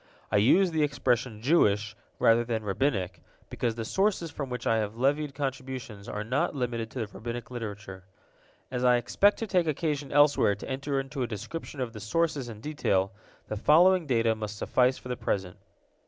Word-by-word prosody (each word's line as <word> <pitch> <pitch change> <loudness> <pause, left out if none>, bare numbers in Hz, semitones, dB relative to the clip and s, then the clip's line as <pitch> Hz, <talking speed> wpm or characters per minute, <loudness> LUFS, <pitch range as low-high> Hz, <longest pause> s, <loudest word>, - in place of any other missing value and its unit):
I 105 - +3
use 175 - +4
the 160 -1 0
expression 125 -6 0
Jewish, 105 -8 +3 0.2
rather 115 +1 +4
than 115 -2 -2
Rabbinic, 95 - -1 0.3
because 120 -2 -1
the 115 -1 -4
sources 190 - 0
from 140 -2 -5
which 125 0 -5
I 115 - +3
have 110 0 -2
levied 140 +2 +1
contributions 130 -6 -5
are 105 - -3
not 125 +6 0
limited 120 -3 -2
to 125 - -5
the - - -1
Rabbinic 120 +2 -6
literature. 105 -5 -7 0.7
As 125 -1 -2
I 125 -1 +5
expect 200 - +3
to 225 - -3
take 180 -5 +1
occasion 145 -2 -1
elsewhere 145 -7 +4
to 100 - -9
enter 135 +1 -2
into 135 +1 -5
a 125 - 0
description 135 - -6
of 120 -3 -3
the 110 - -8
sources 145 +2 -1
in 110 -2 -9
detail, 100 -10 0 0.4
the - - -3
following 170 - +5
data 115 -3 +2
must 105 -1 -6
suffice 125 +4 +2
for - - -11
the 125 - -2
present. 95 -2 -2
125 Hz, 185 wpm, -28 LUFS, 110-145 Hz, 0.7 s, I